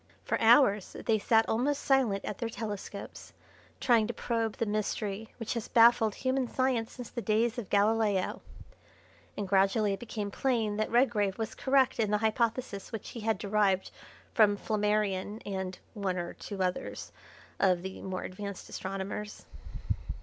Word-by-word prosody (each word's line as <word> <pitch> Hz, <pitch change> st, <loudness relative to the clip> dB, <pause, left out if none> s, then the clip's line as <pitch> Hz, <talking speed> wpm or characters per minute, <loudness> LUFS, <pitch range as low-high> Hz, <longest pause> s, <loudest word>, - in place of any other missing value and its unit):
For -, -, -1 dB
hours 225 Hz, -4 st, +5 dB
they 220 Hz, -2 st, +3 dB
sat 225 Hz, +2 st, +3 dB
almost 280 Hz, +6 st, 0 dB
silent 250 Hz, -8 st, +2 dB
at 210 Hz, -, -5 dB
their 230 Hz, -, -2 dB
telescopes, 205 Hz, -2 st, -7 dB, 0.5 s
trying 230 Hz, -4 st, +4 dB
to 240 Hz, -, -4 dB
probe 230 Hz, -2 st, -1 dB
the 230 Hz, -, 0 dB
mystery 210 Hz, 0 st, -2 dB
which 230 Hz, -3 st, -3 dB
has 230 Hz, -1 st, -4 dB
baffled 230 Hz, -3 st, +5 dB
human 260 Hz, -1 st, 0 dB
science 255 Hz, -3 st, 0 dB
since 245 Hz, -3 st, -8 dB
the 240 Hz, -, -4 dB
days 225 Hz, +2 st, +1 dB
of 210 Hz, -, -7 dB
Galileo, 205 Hz, -2 st, +2 dB, 1.0 s
and 205 Hz, -, -2 dB
gradually 195 Hz, +2 st, +3 dB
it 195 Hz, -, -4 dB
became 215 Hz, -3 st, -4 dB
plain 225 Hz, -4 st, 0 dB
that 215 Hz, -, 0 dB
Redgrave 225 Hz, -6 st, +2 dB
was 220 Hz, -1 st, -3 dB
correct 265 Hz, -2 st, +2 dB
in 215 Hz, -2 st, +2 dB
the 210 Hz, -, +3 dB
hypothesis 220 Hz, -1 st, -1 dB
which 225 Hz, -3 st, -6 dB
he 235 Hz, -, -7 dB
had 220 Hz, 0 st, 0 dB
derived 200 Hz, -2 st, +1 dB, 0.4 s
from 205 Hz, -2 st, +5 dB
Flammarion 210 Hz, -1 st, 0 dB
and 190 Hz, -2 st, -4 dB, 0.2 s
one 195 Hz, -4 st, -2 dB
or 175 Hz, -1 st, -4 dB
two 195 Hz, -3 st, -4 dB
others 180 Hz, 0 st, -3 dB, 0.5 s
of 180 Hz, -2 st, +3 dB
the 190 Hz, 0 st, -6 dB
more 185 Hz, -1 st, -4 dB
advanced 200 Hz, +1 st, -7 dB
astronomers. 195 Hz, +2 st, -5 dB
215 Hz, 155 wpm, -30 LUFS, 200-230 Hz, 1.0 s, hours